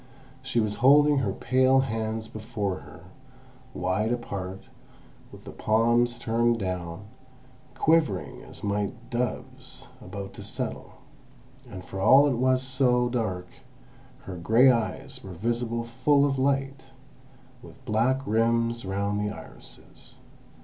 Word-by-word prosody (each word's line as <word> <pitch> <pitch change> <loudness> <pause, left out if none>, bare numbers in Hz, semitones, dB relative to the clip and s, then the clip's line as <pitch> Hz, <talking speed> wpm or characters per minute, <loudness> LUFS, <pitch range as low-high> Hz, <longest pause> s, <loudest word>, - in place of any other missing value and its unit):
She 130 -2 -1
was 105 -2 -1
holding 145 +2 +5
her 110 -7 0
pale 130 +5 +3
hands 110 -3 -3
before 105 -4 -4
her, 75 +1 -13 0.7
wide 95 +5 0
apart, 100 -6 -4 0.7
with - - -13
the - - -9
palms 120 +2 +2
turned 120 +1 +1
down, 90 -2 -4 0.7
quivering 130 - +1
as - - -10
might 105 +4 -3
doves 125 +1 -4 0.2
about 100 +1 -7
to - - -10
settle; - - -5 0.8
and 95 -4 -9
for 95 - -7
all 135 +8 +7
it 145 - +2
was 130 +1 +2
so 125 -2 +2
dark, 100 -7 -2 0.7
her 95 -2 -8
grey 115 +9 +5
eyes 115 -2 -3
were 95 - -8
visible 115 +4 -2
full 140 +5 +2
of 135 -2 0
light, 135 0 0 0.8
with 130 +1 -15
black 125 +4 +1
rims 115 +1 +1
round 100 +2 -1
the 105 - -1
irises. - - -12
115 Hz, 125 wpm, -26 LUFS, 100-130 Hz, 0.8 s, all